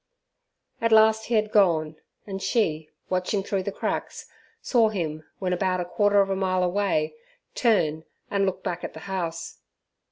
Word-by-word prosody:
At 230 0 +1
last 220 0 +5
he 235 - 0
had 215 -1 +1
gone, 160 -6 +3 0.3
and 195 -2 -6
she, 160 -11 0 0.2
watching 185 +2 0
through 195 -1 -1
the 200 - -3
cracks, - - -4 0.3
saw 230 -4 +3
him 160 -6 -3
when 185 -2 -1
about 185 0 0
a 175 - -2
quarter 205 +2 +3
of 195 0 0
a - - +1
mile 185 -1 +1
away, 180 -4 0 0.4
turn 160 -10 +1 0.3
and 200 -1 +2
look 190 - -3
back 175 -1 -3
at - - -5
the 160 - -10
house. 170 -3 -4
190 Hz, 165 wpm, -25 LUFS, 170-205 Hz, 0.4 s, last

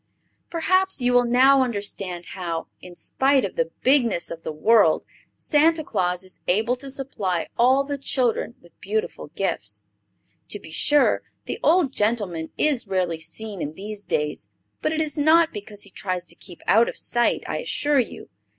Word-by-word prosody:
Perhaps 370 +2 +1
you 245 -1 +1
will 245 0 +5
now 260 +3 +5
understand 200 -7 -3
how, 170 -3 -4 0.2
in 180 -1 -11
spite 270 +7 +1
of - - -6
the - - 0
bigness 250 -9 +3
of 165 -1 -7
the 160 - -5
world, 185 +2 +3 0.3
Santa 315 +1 +2
Claus 180 -7 -1
is 185 - -12
able 220 +7 +2
to 275 +2 -8
supply 210 -10 -2
all 260 +3 +4
the 285 0 -4
children 245 -3 0
with 170 -2 -22
beautiful 215 -3 -3
gifts. 105 - -2 0.7
To - - -1
be 160 - -12
sure, 290 - +3 0.2
the - - -4
old 320 -4 +3
gentleman 205 -7 -1
is 280 -8 +1
rarely 180 -4 0
seen 205 +3 -6
in 150 - -4
these 205 +2 -6
days; 150 - -2 0.3
but - - 0
it 315 0 0
is 300 -1 -2
not 320 +2 +4
because 205 -1 -8
he 200 - -9
tries 185 -2 -3
to - - -8
keep 175 -4 -11
out 225 +3 +4
of - - -8
sight, 240 0 0
I - - -3
assure 295 - +1
you. 245 - -4
220 Hz, 170 wpm, -23 LUFS, 180-275 Hz, 0.7 s, will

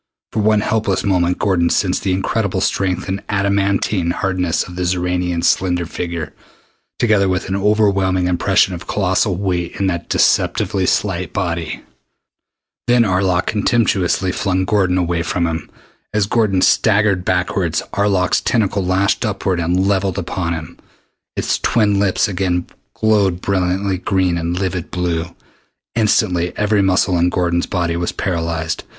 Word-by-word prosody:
For 110 - -2
one 105 0 +3
helpless 105 -3 0
moment 90 -3 +1
Gordon 90 -4 +1
sensed - - +1
the 95 - -1
incredible 95 +1 -1
strength 95 -1 -1
and 95 +1 -3
adamantine 100 -2 0
hardness 90 -1 0
of 90 - -10
the 90 - -4
Xoranian's 90 -1 0
slender 90 -2 +1
figure, 85 -2 -5 0.6
together 105 -5 +2
with 90 -1 -1
an 95 - -1
overwhelming 100 -3 +2
impression 90 +1 +2
of 90 +1 -8
colossal 95 0 +1
weight 90 -2 -2
in 100 - +1
that 85 -2 -2
deceptively 95 -2 +1
slight 90 -4 -1
body. 85 -4 -3 1.0
Then 120 -1 +4
Arlok 95 -2 +1
contemptuously 100 -4 +1
flung 95 0 -1
Gordon 95 -3 +1
away 85 -1 0
from 85 +1 -1
him. 80 -1 -3 0.5
As 105 -2 +2
Gordon 100 -4 +1
staggered 105 -3 +3
backward, 90 -2 0 0.2
Arlok's 100 -2 +1
tentacle 105 -5 0
lashed 95 +2 +1
upward 95 -2 -1
and 90 +3 +1
levelled 95 -2 0
upon 90 -2 -2
him. 80 -2 -7 0.6
Its - - -1
twin 105 -3 +2
tips 100 +1 +2
again 90 -3 -1 0.3
glowed 100 -5 +2
brilliant 95 0 -1
green 95 -3 +1
and 85 +2 -2
livid 95 -3 -3
blue. 85 -1 -2 0.6
Instantly 95 -6 +1
every 105 -1 +2
muscle 95 -2 +2
in 85 +1 +3
Gordon's 85 -1 0
body 85 -4 -1
was 85 +1 -2
paralyzed. 80 -2 -2
95 Hz, 140 wpm, -18 LUFS, 90-100 Hz, 1.0 s, Then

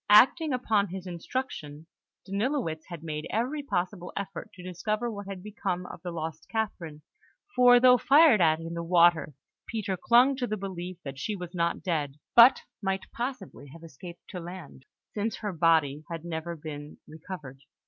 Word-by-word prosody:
Acting 265 +9 +6
upon 220 -5 +1
his 185 0 -7
instructions, 170 - -5 0.4
Danilowitz 200 - -2
had 170 -3 -8
made 155 -1 -4
every 250 +8 -1
possible 180 -7 -3
effort 195 -3 -5
to 180 - -11
discover 210 +6 -2
what 200 -2 -7
had 190 -2 -7
become 180 -4 -3
of - - -10
the 180 - -5
lost 160 -2 -6
Catherine; 170 -9 -4 0.5
for, 245 -1 +7
though 250 0 +6
fired 280 - +6
at 160 -1 +4
in 165 +1 -6
the 170 - -3
water, 170 -3 +4 0.3
Peter 210 -4 -2
clung 245 +8 +4
to 250 -2 -1
the 215 - -2
belief 185 -2 -6
that 135 -1 -7
she 210 +8 -2
was 180 -2 -7
not 170 -1 -1
dead, 150 -6 -1 0.2
but 240 +2 +8 0.2
might 195 -1 -2
possibly 235 - -5
have 165 +4 -13
escaped 170 +3 -11
to 180 - -6
land, 170 -6 -10 0.3
since 215 +2 -2
her 205 -3 -4
body 155 -3 +2
had 165 -1 -6
never 170 0 -4
been 150 -1 -8
recovered. 155 -4 -9
180 Hz, 170 wpm, -28 LUFS, 165-215 Hz, 0.5 s, but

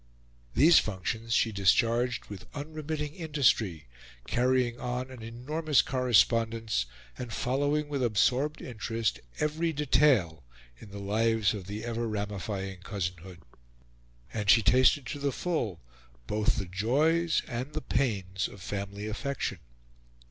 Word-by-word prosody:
These 160 +5 +7
functions 110 +3 -3
she 115 -1 +3
discharged 115 +5 +2
with 100 -3 -10
unremitting 150 0 -4
industry, 120 - +1 0.4
carrying 125 -1 +1
on 125 +1 -3
an 125 -3 -10
enormous 140 +7 0
correspondence, 115 - +2 0.3
and 125 -2 -5
following 145 +6 0
with 145 -2 -2
absorbed 125 +6 +1
interest 115 -2 -2 0.2
every 160 +2 0
detail 130 - +3 0.4
in - - -12
the 100 - -9
lives 110 +1 +1
of 100 -4 -7
the 105 +3 -5
ever 115 0 -2
ramifying 100 -2 -4
cousinhood. 90 -3 -5 0.9
And 105 -3 -2
she 115 +1 +7
tasted 130 +5 +4
to 145 - -5
the 140 0 0
full 120 - -2 0.5
both 105 - +1
the 95 - -2
joys 150 - +1
and 125 +5 -4
the - - -3
pains 100 -8 -1
of 100 - -12
family 100 +1 -5
affection. 110 -3 -3
115 Hz, 125 wpm, -29 LUFS, 100-140 Hz, 0.9 s, These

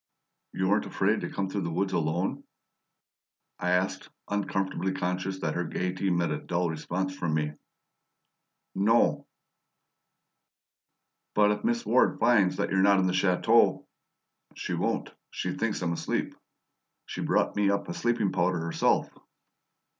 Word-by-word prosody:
"You 95 - -1
weren't 105 +2 +2
afraid 105 +3 +1
to - - -4
come 100 -1 -2
through 100 +1 -3
the 85 - -2
woods 95 +4 -1
alone?" 85 +3 -1 1.2
I 90 - -1
asked, 90 +1 0 0.2
uncomfortably 95 -2 -1
conscious 95 0 -2
that 80 - -1
her 90 - -1
gaiety 90 +3 -2
met 85 -1 +1
a - - -2
dull 85 -1 -1
response 90 +4 -3
from 85 -4 -1
me. 75 -1 -1 1.2
"No." 110 +4 +2 2.1
"But 105 0 +5
if 105 - -3
Miss 235 +1 0
Ward 130 - +3
finds 100 -7 +4
that - - -1
you're 95 0 +3
not 100 0 +5
at 95 - +2
the 90 - +1
chateau 95 +5 +3 0.3
" - - -35
"She - - -4
won't; - - -1 0.2
she - - -3
thinks 110 -4 -2
I'm 85 -1 0
asleep. - - -2 0.7
She - - -6
brought - - +1
me 105 -1 +2
up 100 0 0
a - - -4
sleeping 115 -3 0
powder 90 +1 +1
herself." 85 0 +1
95 Hz, 145 wpm, -28 LUFS, 90-100 Hz, 2.1 s, But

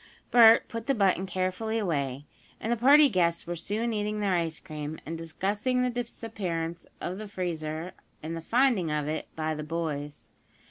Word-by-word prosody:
Bert 230 -1 +8
put 230 0 -6
the 275 - +2
button 195 -3 +2
carefully 185 +5 -1
away, 145 - -1 0.3
and 225 - -2
the - - +3
party 285 +6 +7
guests 175 -7 +1
were 175 - -3
soon 215 +7 -2
eating 210 0 -1
their 200 -2 +1
ice 165 -2 -1
cream, 155 -2 -6
and 165 - -4
discussing 205 +10 -1
the 250 - +1
disappearance 190 -8 -4
of 185 +3 -4
the 215 - -6
freezer 170 -3 -4 0.3
and 160 +2 -4
the 165 - -5
finding 230 -3 +2
of 150 -1 -1
it 155 +1 -3
by 155 0 -1
the 150 - -5
boys. 150 -6 -4
180 Hz, 175 wpm, -28 LUFS, 160-220 Hz, 0.3 s, Bert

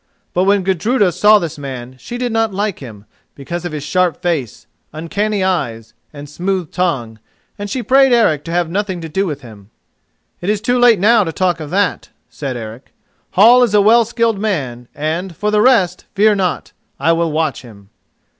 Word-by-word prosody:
But 180 +1 +1
when 200 -1 +2
Gudruda 190 +3 +1
saw 210 +5 +5
this 165 -5 -4
man, 130 -2 -7
she 240 - -7
did 245 -1 -2
not 225 -1 0
like 200 0 -2
him, 110 -6 -11 0.3
because 170 +5 -6
of 175 - -4
his 150 -2 -5
sharp 175 +2 0
face, 155 -10 -3 0.3
uncanny 200 +6 -2
eyes, 115 -12 -2 0.2
and 145 -1 -10
smooth 180 +2 -3
tongue, 125 -12 -2 0.4
and 205 0 -5
she 250 +3 -3
prayed 270 +3 +4
Eric 210 -12 +3
to 165 - -6
have 175 0 0
nothing 190 -1 -2
to 165 - -6
do 190 +5 -1
with 145 -3 -5
him. 105 -5 -14 0.7
"It 175 - -3
is 210 -1 +1
too 245 +3 0
late 240 -4 +5
now 220 +3 +4
to 165 - -4
talk 175 -1 0
of 155 -2 -7
that," 195 +1 -1 0.2
said 135 -4 -5
Eric. 115 +2 -10 0.4
"Hall 235 +6 +6
is 230 -4 +2
a - - +6
well 230 +3 +5
skilled 230 -2 -1
man, 135 - -3
and, 165 +4 -3
for 210 +4 -1
the 210 0 +3
rest, 200 -8 +2
fear 210 +2 +4
not: 185 -4 -2 0.3
I 165 - +2
will 165 -1 0
watch 155 +1 -1
him." 105 -5 -16
180 Hz, 190 wpm, -17 LUFS, 145-210 Hz, 0.7 s, Hall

